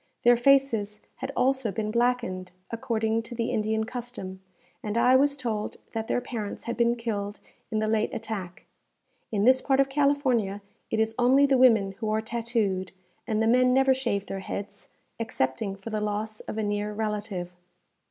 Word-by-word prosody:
Their 240 0 +7
faces 240 -5 +3 0.2
had 265 +1 -4
also 260 -3 +2
been 215 +2 -2
blackened, 235 -6 0 0.2
according 225 -1 0
to 230 +1 -9
the 230 0 -1
Indian 220 +1 0
custom, 230 -6 -6 0.4
and 210 +1 -3
I 250 +2 +5
was 280 +2 +3
told 225 -5 -3 0.2
that 225 -1 -3
their - - +1
parents 220 -5 -5
had 235 - -3
been 235 0 +2
killed 210 -3 -4 0.3
in 220 - -1
the 215 0 +1
late 220 0 +1
attack. 190 -5 -6 0.7
In 205 -2 +1
this 260 +3 +5
part 270 -1 +2
of 275 0 +4
California 265 -8 +1 0.3
it 220 - 0
is 220 0 +1
only 260 +3 +5
the 275 -1 +3
women 220 -6 +5
who 220 -2 -2
are 215 0 +1
tattooed, 220 -5 -1 0.4
and 220 -1 +1
the - - +2
men 250 +2 +4
never 265 0 +5
shave 235 -7 -1
their 195 - -5
heads, 200 +1 -6 0.3
excepting 195 -3 -1
for 195 +3 -8
the 215 -1 -1
loss 210 +1 -2
of - - -7
a 220 - 0
near 205 0 -1
relative. 210 -4 -3
225 Hz, 175 wpm, -27 LUFS, 210-245 Hz, 0.7 s, Their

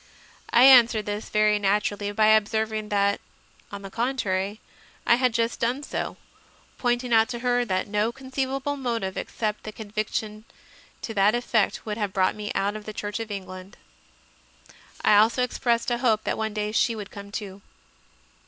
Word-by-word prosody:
I 240 - +6
answered 240 -5 +7
this, 205 +1 -4
very 210 0 +3
naturally, 205 0 0
by 215 +1 +2
observing 220 0 +1
that, 200 0 +1 0.5
on 200 0 -7
the 195 - -8
contrary, 210 -4 -1 0.5
I - - +5
had 255 -1 +2
just 230 +1 -1
done 245 +5 -1
so, - - -4 0.6
pointing 245 0 0
out 225 +1 +5
to 240 -1 -4
her 245 0 +2
that 185 -2 -1
no 210 +2 0
conceivable 270 +2 -3
motive 230 -8 -2
except 215 -2 -3
the 215 - -6
conviction 215 0 -4 0.6
to 225 - -4
that 205 +2 +3
effect 235 -3 0
would 210 -1 -3
have 205 -3 -2
brought 185 -1 +2
me 210 0 -6
out 200 +2 0
of 215 -1 -8
the 215 - -6
Church 205 +1 -4
of 225 -1 -5
England. 190 0 -8 1.3
I 210 - +6
also 225 +4 +4
expressed 240 -1 0
a 240 - 0
hope 220 -4 +2
that - - -1
one 220 -1 -3
day 210 0 -2
she 230 +1 +2
would 210 -2 -8
come 200 -1 -10
too. 200 -2 -6
215 Hz, 170 wpm, -25 LUFS, 205-235 Hz, 1.3 s, answered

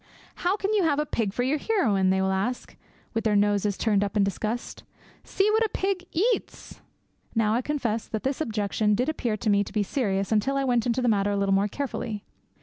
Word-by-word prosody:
'How 365 +3 0
can 405 +1 -1
you 420 - +3
have 315 -5 +2
a 300 - +1
pig 225 -7 -1
for 245 - -1
your 285 +4 +1
heroine?' 215 - +2
they 190 0 +2
will 190 - +1
ask, 200 +7 -2 0.4
with 225 - -1
their 215 -2 +2
noses 205 0 +2
turned 205 -3 +2
up 205 +1 -2
in 205 - +4
disgust. 215 +4 -3 0.4
'See 400 +2 +1
what 440 +1 +3
a 440 - 0
pig 380 -1 -1
eats!' 445 +9 -2 0.5
Now 220 -1 +2
I 240 - +1
confess 240 -6 -2
that 220 - -4
this 270 +3 -1
objection 210 -4 0
did 250 +7 0
appear 240 -8 -1
to 215 +1 -1
me 200 0 +3
to - - -10
be 210 0 +1
serious 195 -4 -1
until 220 +6 +1
I 275 - +1
went 245 -3 +1
into 245 +2 0
the - - +2
matter 205 -3 +2
a 200 - 0
little 200 0 +1
more 195 +1 +3
carefully. 230 -4 -4
225 Hz, 225 wpm, -26 LUFS, 205-280 Hz, 0.5 s, in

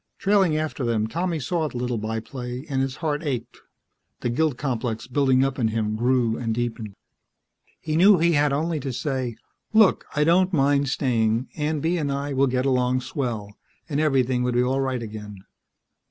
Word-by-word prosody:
Trailing 195 -6 +3
after 155 -3 -3
them, 115 -3 +1
Tommy 170 +7 -2
saw 155 +4 -1
the 125 - -7
little 120 -2 -2
by 110 +1 -2
play 125 +3 -7
and 135 -3 -1
his 135 0 -2
heart 150 0 0
ached. 135 -7 -4 0.6
The 120 - -1
guilt 150 +1 +1
complex 120 -5 -2
building 130 0 +2
up 135 0 -3
in 115 - +2
him 110 -1 -1
grew 120 -1 +1
and 115 -2 -2
deepened. 115 -4 -4 0.8
He 155 -1 -3
knew 190 +4 +6
he 170 +1 +3
had 145 -2 +3
only 155 +3 0
to 135 -2 -4
say, 125 -2 -2 0.4
"Look, 215 -3 +4
I 150 - +3
don't 180 +4 +3
mind 140 -2 +2
staying. 115 -3 0
Aunt 150 -1 -2
Bee 170 +2 +1
and 145 -3 -1
I 140 +1 -2
will 135 +1 +3
get 125 0 0
along 130 -1 +2
swell," 120 -7 -4 0.3
and 145 -3 -1
everything 130 -5 +2
would 125 -1 0
be 125 - +3
all 130 +2 0
right 130 -3 -2
again. 105 -1 -8
130 Hz, 185 wpm, -24 LUFS, 120-150 Hz, 0.8 s, knew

